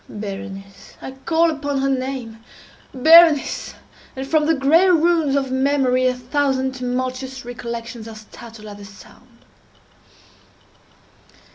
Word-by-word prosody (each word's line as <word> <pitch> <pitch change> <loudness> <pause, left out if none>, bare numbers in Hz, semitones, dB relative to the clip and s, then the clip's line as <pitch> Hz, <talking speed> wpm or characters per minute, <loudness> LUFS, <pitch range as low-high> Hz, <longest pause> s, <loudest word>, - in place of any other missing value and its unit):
Berenice!—I 195 +2 -9
call 330 0 +2
upon 285 -2 -3
her 275 - 0
name—Berenice!—and 265 +4 0
from 305 +1 +1
the 325 - +3
gray 315 +7 +4
ruins 330 -4 +2
of 270 -2 -1
memory 260 -1 +1
a 250 - 0
thousand 265 +1 -1
tumultuous 255 0 -4
recollections 235 -1 -7
are 225 - -9
startled 215 0 -13
at 205 - -10
the 205 - -11
sound! 205 +4 -16
260 Hz, 105 wpm, -20 LUFS, 235-285 Hz, -, gray